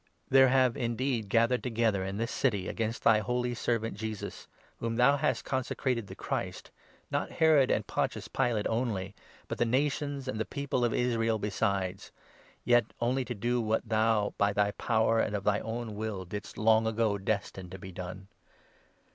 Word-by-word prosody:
There 135 Hz, 0 st, +7 dB
have 130 Hz, -2 st, +3 dB
indeed 120 Hz, -2 st, -1 dB
gathered 115 Hz, +3 st, +3 dB
together 115 Hz, -5 st, 0 dB
in 95 Hz, +1 st, -4 dB
this 115 Hz, +3 st, -2 dB
27 -, -, -5 dB
city 105 Hz, -9 st, +1 dB
against 115 Hz, 0 st, -3 dB
thy 110 Hz, -2 st, +6 dB
holy 125 Hz, +3 st, -1 dB
Servant 115 Hz, -2 st, -1 dB
Jesus, 110 Hz, 0 st, -6 dB, 0.3 s
whom 115 Hz, 0 st, -2 dB
thou 125 Hz, +4 st, +5 dB
hast 140 Hz, -, 0 dB
consecrated 130 Hz, -3 st, -1 dB
the -, -, -9 dB
Christ, -, -, -4 dB, 0.4 s
not -, -, -1 dB
Herod 155 Hz, -5 st, +4 dB
and -, -, +1 dB
Pontius -, -, -2 dB
Pilate 120 Hz, -5 st, 0 dB
only, 110 Hz, -5 st, -1 dB, 0.3 s
but -, -, -5 dB
the -, -, +4 dB
nations 140 Hz, +2 st, -1 dB
and 110 Hz, -4 st, -3 dB
the -, -, +1 dB
people 140 Hz, -2 st, -2 dB
of 120 Hz, -, +2 dB
Israel 115 Hz, -2 st, +1 dB
besides 100 Hz, -2 st, -2 dB, 0.3 s
— -, -, -29 dB
yet 120 Hz, -1 st, +5 dB
only 125 Hz, +3 st, +1 dB
to 120 Hz, -, -4 dB
do 120 Hz, +4 st, 0 dB
28 110 Hz, -, -4 dB
what 110 Hz, +1 st, 0 dB
thou, 110 Hz, -2 st, +2 dB
by 100 Hz, 0 st, +3 dB
thy 100 Hz, 0 st, +2 dB
power 115 Hz, +1 st, +1 dB
and 105 Hz, -, 0 dB
of 100 Hz, -, -3 dB
thy 105 Hz, 0 st, +2 dB
own 115 Hz, 0 st, -4 dB
will, 105 Hz, -3 st, -4 dB
didst 105 Hz, +3 st, -7 dB
long 110 Hz, +1 st, +4 dB
ago 110 Hz, -2 st, +1 dB
destine 95 Hz, -2 st, -3 dB
to 95 Hz, -, -8 dB
be 95 Hz, 0 st, -9 dB
done. 90 Hz, +2 st, -7 dB
115 Hz, 180 wpm, -30 LUFS, 105-125 Hz, 0.4 s, There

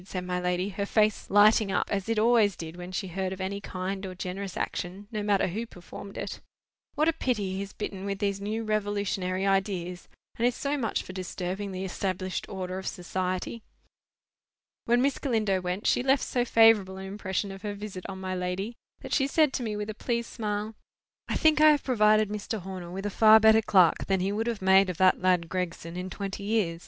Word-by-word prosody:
said 185 Hz, -1 st, -5 dB
my 180 Hz, 0 st, -1 dB
lady, 180 Hz, +2 st, -1 dB
her 200 Hz, +1 st, -3 dB
face 215 Hz, -1 st, +1 dB
lighting 205 Hz, 0 st, +5 dB
up, 185 Hz, -, 0 dB
as 200 Hz, +1 st, -2 dB
it 230 Hz, -, +1 dB
always 220 Hz, -3 st, +4 dB
did 160 Hz, 0 st, -7 dB
when 180 Hz, +1 st, -8 dB
she 190 Hz, +1 st, -3 dB
heard 190 Hz, +1 st, -2 dB
of 190 Hz, -, -6 dB
any 195 Hz, +1 st, -3 dB
kind 190 Hz, +1 st, -4 dB
or 185 Hz, -1 st, -6 dB
generous 185 Hz, +1 st, -5 dB
action, 185 Hz, +3 st, -4 dB
no 215 Hz, -2 st, -2 dB
matter 205 Hz, -2 st, +2 dB
who 215 Hz, +7 st, -3 dB
performed 200 Hz, -1 st, -10 dB
it. -, -, -5 dB, 0.5 s
"What 305 Hz, +2 st, +2 dB
a 330 Hz, -, +4 dB
pity 215 Hz, -11 st, -1 dB
he -, -, -3 dB
is 200 Hz, -1 st, -6 dB
bitten 190 Hz, -1 st, -5 dB
with 200 Hz, 0 st, -2 dB
these 200 Hz, -1 st, -1 dB
new 215 Hz, +3 st, -2 dB
revolutionary 200 Hz, -3 st, -1 dB
ideas, 190 Hz, -2 st, -1 dB, 0.3 s
and 235 Hz, -, +4 dB
is 245 Hz, -, 0 dB
so 285 Hz, +1 st, -1 dB
much 235 Hz, -7 st, -1 dB
for 185 Hz, -, -9 dB
disturbing 185 Hz, +1 st, -4 dB
the 190 Hz, 0 st, -4 dB
established 185 Hz, 0 st, -3 dB
order 185 Hz, -1 st, -4 dB
of 190 Hz, -, -7 dB
society!" 185 Hz, +4 st, -3 dB, 1.2 s
When 240 Hz, +2 st, +3 dB
Miss 275 Hz, -1 st, +1 dB
Galindo 215 Hz, -8 st, 0 dB
went, 180 Hz, +3 st, -3 dB
she -, -, +3 dB
left 270 Hz, +2 st, +2 dB
so 245 Hz, -1 st, 0 dB
favourable 225 Hz, -5 st, +5 dB
an 190 Hz, -, -7 dB
impression 195 Hz, 0 st, -3 dB
of 195 Hz, 0 st, -9 dB
her 205 Hz, -1 st, -4 dB
visit 200 Hz, -3 st, -7 dB
on 190 Hz, -1 st, -6 dB
my 185 Hz, 0 st, -3 dB
lady, 185 Hz, +4 st, -3 dB, 0.3 s
that -, -, -6 dB
she 270 Hz, -2 st, +3 dB
said 300 Hz, -1 st, +3 dB
to -, -, -2 dB
me 220 Hz, -3 st, -2 dB
with 210 Hz, +1 st, -3 dB
a 215 Hz, -, -14 dB
pleased 235 Hz, -1 st, -1 dB
smile— 210 Hz, -1 st, -3 dB, 0.5 s
"I -, -, -2 dB
think 310 Hz, -1 st, +4 dB
I 310 Hz, -, +9 dB
have 295 Hz, -2 st, +3 dB
provided 215 Hz, -4 st, +4 dB
Mr. 210 Hz, 0 st, -4 dB
Horner 185 Hz, -1 st, -7 dB
with 195 Hz, +3 st, -6 dB
a 205 Hz, -, -1 dB
far 220 Hz, 0 st, +9 dB
better 220 Hz, 0 st, +6 dB
clerk 185 Hz, -6 st, +4 dB
than 195 Hz, -1 st, +2 dB
he 190 Hz, +2 st, 0 dB
would 220 Hz, +3 st, -1 dB
have 230 Hz, -5 st, -3 dB
made 190 Hz, 0 st, +5 dB
of 180 Hz, -, -4 dB
that 185 Hz, 0 st, +4 dB
lad 180 Hz, -2 st, +2 dB
Gregson 170 Hz, -2 st, -4 dB
in 180 Hz, +1 st, -4 dB
twenty 200 Hz, 0 st, -5 dB
years. 200 Hz, -6 st, 0 dB
200 Hz, 215 wpm, -28 LUFS, 185-215 Hz, 1.2 s, I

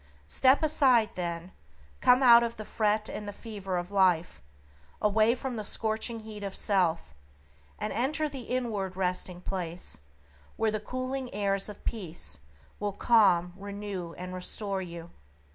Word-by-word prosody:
Step 260 Hz, -, +4 dB
aside, 260 Hz, -7 st, +4 dB
then; 170 Hz, 0 st, -4 dB, 0.5 s
come 250 Hz, +1 st, +5 dB
out 235 Hz, -2 st, +9 dB
of 235 Hz, 0 st, -2 dB
the 215 Hz, -, -6 dB
fret 215 Hz, 0 st, +1 dB
and 210 Hz, -, -6 dB
the -, -, -3 dB
fever 200 Hz, -3 st, -5 dB
of 175 Hz, +2 st, -4 dB
life; 185 Hz, -4 st, +2 dB, 0.6 s
away 215 Hz, +2 st, +3 dB
from 255 Hz, -1 st, -4 dB
the 215 Hz, -, -3 dB
scorching 220 Hz, +2 st, 0 dB
heat 215 Hz, -1 st, -8 dB
of 195 Hz, -1 st, -4 dB
self, 180 Hz, -, +1 dB, 0.6 s
and -, -, -3 dB
enter 300 Hz, +6 st, 0 dB
the 280 Hz, -2 st, -7 dB
inward 215 Hz, -7 st, -2 dB
resting 180 Hz, -1 st, -1 dB
place 175 Hz, -, -5 dB, 0.6 s
where 220 Hz, -1 st, +2 dB
the 215 Hz, -, -1 dB
cooling 255 Hz, +3 st, -4 dB
airs 200 Hz, -1 st, +1 dB
of 210 Hz, -, -11 dB
peace 155 Hz, -, -4 dB, 0.4 s
will 205 Hz, -1 st, -2 dB
calm, 190 Hz, -6 st, +4 dB
renew, 200 Hz, -3 st, -6 dB
and 180 Hz, +1 st, -7 dB
restore 195 Hz, +2 st, -1 dB
you. 170 Hz, -2 st, -8 dB
205 Hz, 145 wpm, -29 LUFS, 180-230 Hz, 0.6 s, out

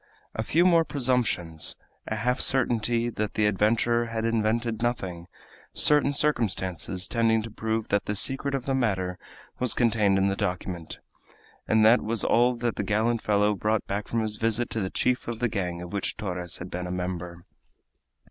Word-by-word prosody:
A -, -, -3 dB
few 165 Hz, +10 st, +2 dB
more 170 Hz, -2 st, +5 dB
presumptions, 120 Hz, -, 0 dB, 0.3 s
a 110 Hz, -, -2 dB
half 125 Hz, +4 st, 0 dB
certainty 120 Hz, -2 st, +3 dB
that 105 Hz, -2 st, -4 dB
the 105 Hz, -, +2 dB
adventurer 115 Hz, +3 st, +1 dB
had 115 Hz, 0 st, -3 dB
invented 115 Hz, 0 st, 0 dB
nothing, 95 Hz, -8 st, -3 dB, 0.5 s
certain 150 Hz, -1 st, +4 dB
circumstances 95 Hz, -, -1 dB
tending 115 Hz, -1 st, +1 dB
to 115 Hz, -, -8 dB
prove 110 Hz, 0 st, -3 dB
that 100 Hz, -, +1 dB
the 105 Hz, -, -2 dB
secret 135 Hz, +6 st, +1 dB
of 130 Hz, -, -4 dB
the 135 Hz, -, -1 dB
matter 95 Hz, -8 st, -1 dB, 0.4 s
was 125 Hz, -1 st, +3 dB
contained 110 Hz, -5 st, +2 dB
in 95 Hz, 0 st, +2 dB
the 100 Hz, -, 0 dB
document 90 Hz, -3 st, -4 dB, 0.7 s
and 110 Hz, -1 st, +4 dB
that 115 Hz, +3 st, +6 dB
was 110 Hz, -1 st, -1 dB
all 120 Hz, +1 st, +3 dB
that 120 Hz, -1 st, -2 dB
the -, -, -1 dB
gallant 110 Hz, +2 st, 0 dB
fellow 105 Hz, 0 st, +2 dB
brought 105 Hz, +1 st, -1 dB
back 100 Hz, +1 st, -4 dB
from 115 Hz, -, -1 dB
his 110 Hz, -1 st, -3 dB
visit 115 Hz, +2 st, -1 dB
to 110 Hz, -, -2 dB
the 95 Hz, -, -2 dB
chief 125 Hz, +5 st, -1 dB
of 120 Hz, -1 st, -3 dB
the 120 Hz, +2 st, 0 dB
gang 90 Hz, -5 st, -3 dB
of 90 Hz, -, -9 dB
which 100 Hz, -, -2 dB
Torres 90 Hz, -4 st, -3 dB
had 90 Hz, +1 st, -8 dB
been 90 Hz, 0 st, -4 dB
a -, -, -5 dB
member. 90 Hz, -1 st, -5 dB
110 Hz, 180 wpm, -26 LUFS, 95-120 Hz, 0.7 s, that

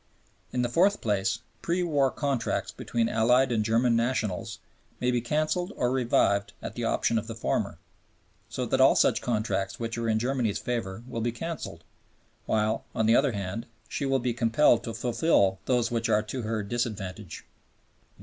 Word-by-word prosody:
In 125 Hz, -1 st, 0 dB
the -, -, +1 dB
fourth 190 Hz, +11 st, +3 dB
place, 110 Hz, +2 st, 0 dB, 0.2 s
pre 175 Hz, +2 st, 0 dB
war 145 Hz, -5 st, +2 dB
contracts 135 Hz, -4 st, -1 dB
between 115 Hz, -1 st, -1 dB
Allied 125 Hz, +4 st, +3 dB
and 110 Hz, -2 st, +1 dB
German 115 Hz, +2 st, +2 dB
nationals 115 Hz, -3 st, -1 dB, 0.4 s
may 125 Hz, 0 st, +1 dB
be 120 Hz, -1 st, +1 dB
canceled 155 Hz, -, -1 dB
or 125 Hz, 0 st, 0 dB
revived 100 Hz, -6 st, +2 dB
at -, -, -6 dB
the 120 Hz, -, -5 dB
option 115 Hz, 0 st, +1 dB
of 110 Hz, -, -8 dB
the 115 Hz, -, -6 dB
former, 115 Hz, -, -1 dB, 0.7 s
so -, -, -3 dB
that -, -, +1 dB
all -, -, +6 dB
such -, -, +3 dB
contracts 105 Hz, -4 st, -1 dB
which 115 Hz, 0 st, -3 dB
are 115 Hz, -1 st, -1 dB
in 110 Hz, -, +2 dB
Germany's 120 Hz, -2 st, 0 dB
favor 115 Hz, -3 st, -3 dB
will 115 Hz, -2 st, -4 dB
be 120 Hz, +1 st, 0 dB
canceled, 165 Hz, +8 st, -6 dB, 0.6 s
while, 110 Hz, 0 st, +1 dB
on 110 Hz, -, +1 dB
the 115 Hz, +2 st, +5 dB
other 135 Hz, -1 st, +3 dB
hand, 100 Hz, +2 st, -4 dB, 0.2 s
she 140 Hz, -, -3 dB
will 135 Hz, 0 st, +2 dB
be 125 Hz, -1 st, -1 dB
compelled 115 Hz, +1 st, +3 dB
to 115 Hz, -, -5 dB
fulfil 115 Hz, -, +2 dB
those 120 Hz, -2 st, +1 dB
which 115 Hz, -1 st, -1 dB
are 105 Hz, 0 st, +3 dB
to 125 Hz, +4 st, -5 dB
her 110 Hz, -1 st, -2 dB
disadvantage. 105 Hz, -4 st, -4 dB
115 Hz, 175 wpm, -27 LUFS, 110-125 Hz, 0.7 s, all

